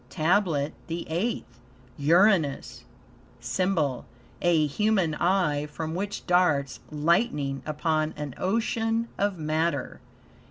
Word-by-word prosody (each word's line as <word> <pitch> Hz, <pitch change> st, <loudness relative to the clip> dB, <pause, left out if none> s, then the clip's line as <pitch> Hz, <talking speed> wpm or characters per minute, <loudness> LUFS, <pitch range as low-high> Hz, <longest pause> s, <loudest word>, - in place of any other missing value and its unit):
TABLET 160 Hz, -3 st, +1 dB
THE 170 Hz, 0 st, -4 dB
EIGHTH 180 Hz, -, -3 dB, 0.4 s
Uranus 165 Hz, -1 st, +2 dB, 0.5 s
SYMBOL 165 Hz, -11 st, -1 dB, 0.3 s
A 170 Hz, -3 st, +3 dB
human 190 Hz, +1 st, +1 dB
eye, 150 Hz, -4 st, +1 dB
from 160 Hz, +2 st, -5 dB
which 200 Hz, +3 st, -4 dB
darts 160 Hz, -7 st, +2 dB
lightning 150 Hz, -, +1 dB
upon 155 Hz, 0 st, 0 dB
an 145 Hz, -3 st, -5 dB
ocean 225 Hz, +3 st, 0 dB
of 200 Hz, -2 st, 0 dB
matter. 155 Hz, -3 st, -1 dB
165 Hz, 95 wpm, -26 LUFS, 150-195 Hz, 0.5 s, A